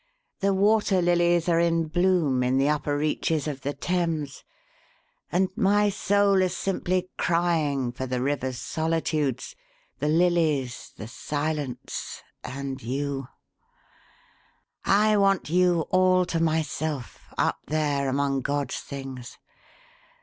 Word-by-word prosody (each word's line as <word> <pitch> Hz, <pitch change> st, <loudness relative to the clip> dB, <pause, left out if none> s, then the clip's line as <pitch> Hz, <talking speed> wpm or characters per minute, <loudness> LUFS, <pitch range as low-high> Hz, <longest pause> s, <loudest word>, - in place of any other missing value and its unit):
The 200 Hz, 0 st, +2 dB
water 200 Hz, 0 st, +3 dB
lilies 175 Hz, -1 st, +2 dB
are 170 Hz, -1 st, +3 dB
in 165 Hz, -1 st, +2 dB
bloom 170 Hz, -5 st, +2 dB
in 125 Hz, +1 st, +1 dB
the 135 Hz, +1 st, +3 dB
upper 145 Hz, -1 st, 0 dB
reaches 155 Hz, +1 st, 0 dB
of 140 Hz, -3 st, -4 dB
the 140 Hz, +2 st, -2 dB
Thames 165 Hz, -5 st, -2 dB, 0.9 s
and 185 Hz, +2 st, +2 dB
my 205 Hz, -1 st, +3 dB
soul 200 Hz, 0 st, +2 dB
is 185 Hz, -1 st, 0 dB
simply 185 Hz, -1 st, -1 dB
crying 160 Hz, -7 st, +1 dB
for 130 Hz, +2 st, -5 dB
the 125 Hz, 0 st, -2 dB
river's 130 Hz, -1 st, -1 dB
solitudes, 160 Hz, -, -2 dB, 0.4 s
the 150 Hz, -, -1 dB
lilies, 155 Hz, -6 st, +1 dB
the 110 Hz, -, -7 dB
silence, 145 Hz, 0 st, -4 dB, 0.2 s
and 135 Hz, 0 st, -5 dB
you! 135 Hz, +2 st, -3 dB, 1.6 s
I 210 Hz, +2 st, +4 dB
want 195 Hz, -5 st, +2 dB
you 180 Hz, -1 st, +3 dB
all 185 Hz, 0 st, +4 dB
to 170 Hz, -1 st, -2 dB
myself 155 Hz, -, -2 dB
up -, -, +1 dB
there, 145 Hz, -3 st, 0 dB
among 135 Hz, 0 st, 0 dB
God's 140 Hz, 0 st, -2 dB
things. 135 Hz, -3 st, -8 dB
155 Hz, 120 wpm, -26 LUFS, 140-180 Hz, 1.6 s, I